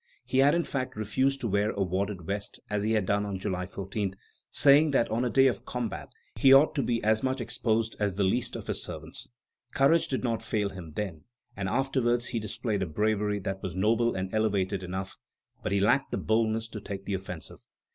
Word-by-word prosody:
He 130 - +1
had, 140 +3 +5
in 170 - +2
fact, 130 -4 -3
refused 130 +6 0
to 115 - -1
wear 100 +1 +1
a 100 - 0
wadded 95 0 -2
vest, 100 +4 -3
as 105 -1 0
he 110 +2 +1
had 105 -3 +2
done 100 +2 +1
on 100 -2 -3
July 90 -2 -3
14, 95 0 -4 0.3
saying 145 +2 +5
that 135 -5 +2
on 115 +3 +1
a 125 - +1
day 135 +2 +5
of 130 - +1
combat 120 -4 -4 0.3
he 135 +4 +6
ought 135 +3 +7
to 140 - 0
be 120 -3 -1
as 110 +1 +3
much 130 0 -1
exposed 115 -1 -1
as 100 -3 0
the 100 - +1
least 115 +6 +1
of - - -6
his - - -1
servants. - - -6 0.5
Courage 150 +5 +4
did 130 - -2
not 115 -3 0
fail 105 -2 -1
him 90 -5 -9
then, 95 -7 -4 0.3
and 95 -1 -2
afterwards 120 0 +1
he 120 - -2
displayed 105 -1 -2
a 95 - -1
bravery 105 +4 0
that 95 -1 -4
was 90 -2 -5
noble 115 +5 +2
and 95 0 -3
elevated 100 -4 +1
enough; 95 +1 -5 0.4
but - - -3
he 100 - +2
lacked 125 +7 +3 0.2
boldness 110 0 +1
to 110 -2 -7
take 100 -1 -6
the 100 - -2
offensive.... 90 -3 -6
105 Hz, 210 wpm, -28 LUFS, 95-120 Hz, 0.5 s, ought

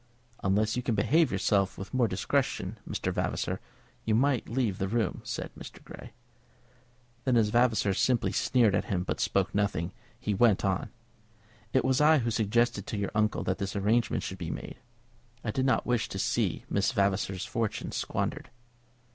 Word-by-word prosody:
"Unless 105 +3 +2
you 125 - -1
can 120 -2 -1
behave 155 +11 +3
yourself 100 -2 +1
with 95 - -8
more 125 -2 +3
discretion, 95 -2 -1
Mr. - - -2
Vavasor, - - -1 0.4
you 110 - +1
must 130 +1 +2
leave 115 -5 0
the 95 - 0
room," 115 +2 -1
said - - -5
Mr. - - -11
Grey. - - -11 1.1
Then, 130 -3 +3
as 110 -2 +3
Vavasor 115 -3 +3
simply 120 +4 +2
sneered 120 -6 +3
at 100 - +1
him, 90 -3 -1
but - - -3
spoke 95 -1 +1
nothing, 100 -4 0 0.3
he 110 -4 -1
went 105 -1 +3
on. 95 -1 0 0.8
"It 130 - +2
was 130 +1 +2
I 155 +1 +6
who 120 -4 0
suggested 115 -1 +1
to 110 - -3
your 100 -1 -2
uncle 105 0 +1
that 95 - -1
this 100 0 -3
arrangement 105 +3 +1
should - - -5
be - - -4
made. - - -6 0.7
I - - -1
did 130 +4 0
not 130 - +2
wish 125 -2 0
to - - -5
see - - 0
Miss 100 0 +1
Vavasor's 100 -3 0
fortune 115 -3 -2
squandered." - - -3
110 Hz, 170 wpm, -29 LUFS, 100-120 Hz, 1.1 s, I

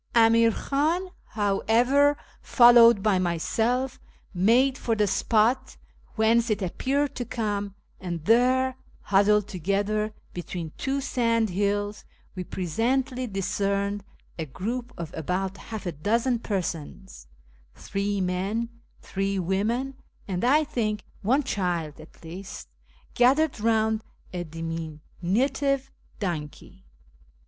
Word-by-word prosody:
Amir 230 0 +5
Khan, 315 - 0 0.2
however, 240 +8 +2 0.2
followed 235 -4 +7
by 205 -4 +3
myself, 225 +9 0 0.3
made 235 +9 +3
for 230 -4 -1
the 210 -1 +2
spot 225 +5 +1 0.4
whence 230 +2 +3
it 210 -2 0
appeared 275 +10 -1
to 245 - -2
come, 205 -4 -3 0.2
and 170 -4 -5
there, 255 +3 +3 0.3
huddled 205 +1 +3
together 205 +4 -1 0.2
be 175 - -4
tween 170 -2 -6
two 275 +1 -2
sandhills, 205 -5 0 0.3
we 185 - -5
presently 250 - -1
discerned 200 0 -1 0.4
a 160 - -3
group 235 - -4
of 165 -2 -6
about 185 +5 -2
half 220 0 -7
a 175 - -1
dozen 230 - 0
persons 190 - -5 0.5
(three 200 0 -2
men, 195 +5 -1 0.3
three 195 0 -2
women, 210 +9 -1 0.3
and, 185 -3 -2
I 290 +6 +4
think, 215 -7 -2 0.2
one 260 +8 +2
child 175 - -2
at 155 +2 -15
least) 185 +4 -8 0.4
gathered 270 +2 +3
round 220 0 +1 0.3
a 175 -1 -3
diminutive 175 - -2 0.3
donkey. 155 - -5
210 Hz, 110 wpm, -26 LUFS, 185-245 Hz, 0.5 s, followed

